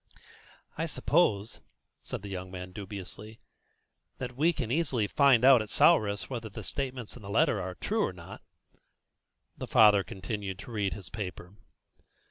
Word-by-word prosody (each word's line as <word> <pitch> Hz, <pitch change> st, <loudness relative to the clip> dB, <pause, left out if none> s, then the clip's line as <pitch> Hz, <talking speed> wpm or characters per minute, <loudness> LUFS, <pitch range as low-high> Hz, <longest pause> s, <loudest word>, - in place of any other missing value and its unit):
"I 165 Hz, -, 0 dB
suppose," 115 Hz, -, +1 dB, 0.4 s
said -, -, -6 dB
the 100 Hz, -, -7 dB
young 95 Hz, -1 st, -6 dB
man 90 Hz, 0 st, -7 dB
dubiously, 100 Hz, +2 st, -8 dB, 0.8 s
"that 125 Hz, -1 st, -6 dB
we 155 Hz, +6 st, +3 dB
can 125 Hz, -8 st, -4 dB
easily 135 Hz, -7 st, +1 dB
find 130 Hz, +1 st, +4 dB
out 130 Hz, -3 st, +8 dB
at 110 Hz, -, -6 dB
Souris 100 Hz, -2 st, +3 dB
whether 115 Hz, -4 st, -5 dB
the 100 Hz, -, -8 dB
statements 130 Hz, -5 st, -5 dB
in -, -, -12 dB
the 100 Hz, -, -9 dB
letter 100 Hz, -1 st, +2 dB
are 90 Hz, 0 st, -5 dB
true -, -, -1 dB
or -, -, 0 dB
not?" -, -, -11 dB, 1.2 s
The -, -, -6 dB
father 105 Hz, -3 st, +6 dB
continued 95 Hz, -1 st, -5 dB
to 100 Hz, -, -10 dB
read 100 Hz, -3 st, -1 dB
his 100 Hz, -4 st, -7 dB
paper. 95 Hz, -3 st, -6 dB
105 Hz, 155 wpm, -29 LUFS, 100-125 Hz, 1.2 s, out